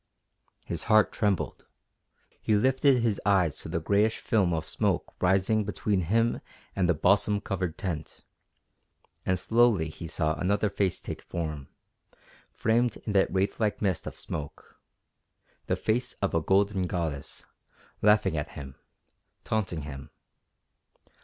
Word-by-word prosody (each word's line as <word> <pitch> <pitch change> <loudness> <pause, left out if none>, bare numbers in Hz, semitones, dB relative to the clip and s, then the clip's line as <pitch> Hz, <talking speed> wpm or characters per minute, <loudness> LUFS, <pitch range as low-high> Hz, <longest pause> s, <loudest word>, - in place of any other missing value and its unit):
_ - - -37
His 85 -2 -3
heart 110 -1 +5
trembled. 100 -4 -1 0.7
He 110 - +2
lifted 130 +2 +3
his 110 -4 0
eyes 95 -6 +2
to - - -7
the 85 - -1
grayish 105 +6 +2
film 100 -6 +1
of 80 -1 -2
smoke - - -1
rising 95 +4 +2
between 105 -1 -1
him 115 +7 +1 0.3
and 90 -3 +1
the 90 - +4
balsam 100 +5 +3
covered 90 -5 -3
tent, 85 -7 -5 1.0
and 95 - +2
slowly 110 -6 +3
he 85 +2 -8
saw 80 0 0
another 100 +5 0
face 100 -3 0
take - - -7
form, 80 -5 -5 0.8
framed 120 +2 +1
in 105 - -2
that 95 - +3
wraith 95 +1 0
like 110 -2 0
mist 95 -5 -1
of - - -7
smoke 75 -1 -8 0.9
the - - +1
face 115 +3 -1
of 100 - -2
a 80 - +2
golden 95 +1 +2
goddess, 80 -6 -4 0.6
laughing 105 -5 +4
at 75 - -4
him, 70 -2 -7 0.7
taunting 95 -8 -2
him. 70 -2 -8
95 Hz, 140 wpm, -28 LUFS, 85-105 Hz, 1.0 s, heart